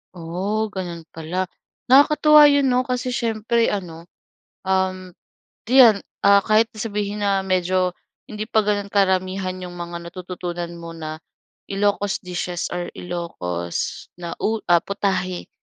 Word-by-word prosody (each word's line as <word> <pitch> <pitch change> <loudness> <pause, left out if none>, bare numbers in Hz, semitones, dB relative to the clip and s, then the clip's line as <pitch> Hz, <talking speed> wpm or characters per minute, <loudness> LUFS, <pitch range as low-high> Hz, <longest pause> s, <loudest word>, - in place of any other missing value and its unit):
Oh, 190 +6 -2
ganun 175 -4 -5
pala. 175 +3 -3 0.4
Nakakatuwa 300 +2 +7
yun 285 -1 +3
'no, 250 +1 +2
kasi 250 0 -2
siyempre, 230 0 0
ano, 170 -4 -4 0.6
um, 185 -1 -1 0.6
'yan, 240 -6 +7 0.2
ah, 200 0 +6
kahit 220 +1 +4
sabihin 210 -1 -3
na 195 -1 +2
medyo 185 -1 0 0.3
hindi 215 -1 -5
pa 220 0 +2
gan'on 205 -1 -1
karamihan 185 -1 +1
'yong 180 -1 -7
mga 175 0 -6
natututunan 175 -1 -6
mo 170 0 -8
na 155 -1 -7 0.5
Ilocos 205 0 0
dishes 180 -1 -3
or 175 0 -4
Ilocos 90 - -4
na 170 -1 -5
u 220 0 0 0.3
putahe 190 -2 -2
190 Hz, 125 wpm, -22 LUFS, 175-210 Hz, 0.6 s, Nakakatuwa